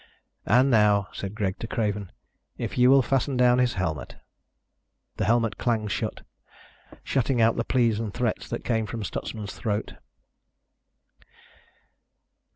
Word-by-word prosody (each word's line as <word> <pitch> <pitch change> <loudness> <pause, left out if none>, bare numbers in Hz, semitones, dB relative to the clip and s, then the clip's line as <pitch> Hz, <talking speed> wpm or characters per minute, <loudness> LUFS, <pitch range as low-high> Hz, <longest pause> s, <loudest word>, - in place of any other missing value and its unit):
"And 130 +2 +4
now," 105 -3 +3
said 100 +1 -6
Greg 100 -3 -2
to 115 - -5
Craven, 105 -4 -2 0.5
"if - - -4
you 125 0 +5
will 135 0 +6
fasten 135 0 0
down 125 0 +4
his 125 -1 +1
helmet." 80 -7 -3 1.0
The - - 0
helmet 115 -3 +1
clanged 110 -4 0
shut, - - -3 0.8
shutting 130 -1 0
out 115 0 +4
the 115 - -1
pleas 115 -4 +1
and 110 -2 -3
threats 120 0 -2
that 120 - -5
came 110 -3 0
from 115 +1 -5
Stutsman's 105 +1 -5
throat. 105 -1 -3
115 Hz, 135 wpm, -26 LUFS, 105-125 Hz, 1.0 s, will